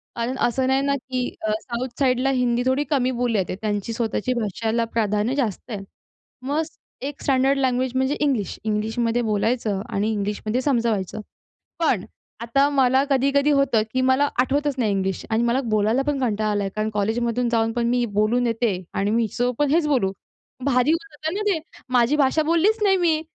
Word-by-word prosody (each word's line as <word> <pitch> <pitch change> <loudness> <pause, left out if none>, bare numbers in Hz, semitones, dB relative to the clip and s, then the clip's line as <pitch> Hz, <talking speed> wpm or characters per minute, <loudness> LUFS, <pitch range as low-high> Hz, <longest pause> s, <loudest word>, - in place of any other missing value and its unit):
कारण 240 +3 -2
असं 255 +2 +1
नाही 265 +1 +2
ना, 280 0 +1
की 255 -2 -3
अ, 215 - -1
साऊथ 245 +1 -4
साईडला 260 0 +2
हिंदी 245 -2 +1
थोडी 260 +3 +2
कमी 260 -4 +1
बोलली 240 -3 +1
जाते. 185 -1 -2
त्यांची 210 +1 -2
स्वतःची 230 +1 -1
भाषाला 225 +2 -1
प्राधान्य 215 +2 0
जास्त 240 -6 -2
आहे. 200 -3 -4 0.6
मग 290 +4 0 0.5
एक 290 - -11
स्टँडर्ड 270 0 +2
लँग्वेज 255 -1 +1
म्हणजे 265 +2 +1
इंग्लिश. 265 -9 0
इंग्लिशमध्ये 225 +2 0
बोलायचं 215 -1 0
आणि 210 +3 0
इंग्लिशमध्ये 210 +3 -2
समजवायचं. 230 - 0 0.6
पण 255 - +1 0.4
आता 275 +5 +2
मला 265 -1 +3
कधी-कधी 280 +2 +3
होतं, 275 -6 +3
की 255 - +1
मला 260 +2 +3
आठवतच 285 +2 +1
नाही 225 -5 +1
इंग्लिश. 190 -1 -2
आणि 225 +1 +1
मला 240 +3 +2
बोलायला 215 +4 +2
पण 290 -2 0
कंटाळा 215 -4 0
आलाय. 205 -1 -1
कारण 215 0 -1
कॉलेजमधून 235 +3 0
जाऊन 225 -1 +1
पण 235 0 0
मी 245 0 +2
बोलून 220 +4 +2
येते. 225 -5 -1
आणि 200 +1 0
मी 230 +2 +2
हिच्यासोबत 245 +3 -1
पण 295 -1 +2
हेच 315 -1 +3
बोलू. 245 -10 +2 0.5
भारी 255 +1 +3
होऊन 330 0 -1
जातं 310 +2 -4
ना 415 - -2
ते. 340 - 0 0.3
माझी 245 +3 +4
भाषा 295 +2 +3
बोललीच 340 +8 +2
नाही 385 -2 +4
मी. 330 -3 +2
245 Hz, 175 wpm, -23 LUFS, 220-275 Hz, 0.6 s, माझी